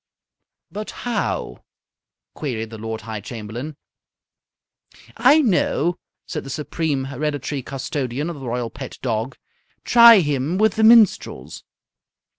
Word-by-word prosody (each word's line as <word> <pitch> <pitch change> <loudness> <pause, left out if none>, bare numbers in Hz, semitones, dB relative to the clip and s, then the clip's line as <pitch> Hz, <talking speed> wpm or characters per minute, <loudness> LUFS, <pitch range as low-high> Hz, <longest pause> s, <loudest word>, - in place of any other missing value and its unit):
"But 210 +1 -6 0.2
how?" 240 -2 -3 0.7
queried 115 -7 -4
the 110 - -9
Lord 110 0 -5
High 110 -1 -6
Chamberlain. 120 +7 -7 1.4
"I 305 +2 +5
know," 180 - +1 0.3
said 155 - -5
the 135 - -9
Supreme 150 -1 -2
Hereditary 145 +1 -3
Custodian 135 +1 -4
of 170 -4 -6
the 130 - -7
Royal 120 -1 -3
Pet 130 +2 -9
Dog. 115 +1 -2 0.5
"Try 235 -4 +8
him 145 +2 -1
with 215 0 +3
the 220 - 0
minstrels." 215 - +3
140 Hz, 115 wpm, -21 LUFS, 120-175 Hz, 1.4 s, Try